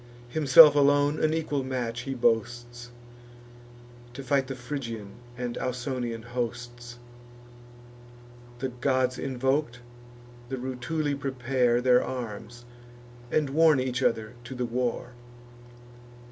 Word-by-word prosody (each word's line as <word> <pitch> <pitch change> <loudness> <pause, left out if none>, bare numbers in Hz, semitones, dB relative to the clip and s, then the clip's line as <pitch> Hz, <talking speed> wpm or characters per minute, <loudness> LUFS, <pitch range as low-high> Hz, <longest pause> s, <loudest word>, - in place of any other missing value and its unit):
Himself 150 +2 +8
alone 145 +1 +3
an 155 - +3
equal 150 -4 -1
match 120 -3 -3
he 135 - -2
boasts, 120 +1 -1 1.2
To 135 +2 -8
fight 135 0 +1
the 135 - -5
Phrygian 125 -5 -6 0.3
and 125 -1 -4
Ausonian 125 -2 -3
hosts. 120 0 -5 1.6
The 130 +2 -3
gods 130 0 0
invok'd, 130 0 -1 0.7
the 135 - -3
Rutuli 130 +4 -2
prepare 130 -3 0
Their 125 -1 +4
arms, 120 -1 -7 0.6
and 150 -3 0
warn 155 -1 +5
each 130 0 -2
other 110 -3 0
to 130 +2 -7
the 125 0 -2
war. 125 0 -2
125 Hz, 105 wpm, -27 LUFS, 120-135 Hz, 1.6 s, Himself